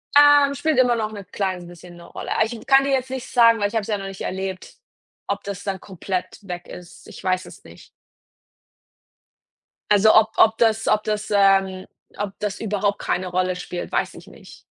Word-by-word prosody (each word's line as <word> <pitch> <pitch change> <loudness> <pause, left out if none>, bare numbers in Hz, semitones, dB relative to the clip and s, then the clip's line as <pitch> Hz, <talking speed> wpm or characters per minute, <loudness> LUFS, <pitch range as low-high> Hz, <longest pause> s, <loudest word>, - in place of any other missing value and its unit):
Ähm, 290 -1 +6
spielt 310 0 0
immer 245 -2 +4
noch 220 -2 -2
'ne 200 -2 -9
klein 185 -2 -3
bisschen 175 0 -13
'ne 170 - -13
Rolle. - - -8
Aber 220 - +3
ich 225 0 -8
kann 270 0 +5
dir 275 - -1
jetzt 260 -1 0
nicht 260 -1 -6
sagen, 230 -1 +5
weil 205 - +2
ich 205 - -10
habe 225 - +2
es 200 - -9
ja 210 -2 -1
noch 195 - -7
nicht 195 -1 -9
erlebt, 190 0 -5 0.5
ob - - -3
das 200 -2 -6
dann 195 -2 -3
komplett 185 0 -5
weg 175 -1 -6
ist. 175 -1 -12
Ich - - -12
weiß 185 0 0
es - - -14
nicht. - - -15 2.0
Also, 210 +1 +6
ob 220 0 +5
ob 220 0 +5
das 225 -1 +2
ob 215 0 +2
das, 210 0 -3
ähm 195 -2 +3 0.3
ob 205 -1 -4
das 205 -1 -3
überhaupt 205 -2 -1
keine 185 +1 -2
Rolle 185 0 -1
spielt, 180 0 -6
weiß - - -1
ich - - -13
nicht. - - -15
205 Hz, 205 wpm, -22 LUFS, 185-225 Hz, 2.0 s, Ähm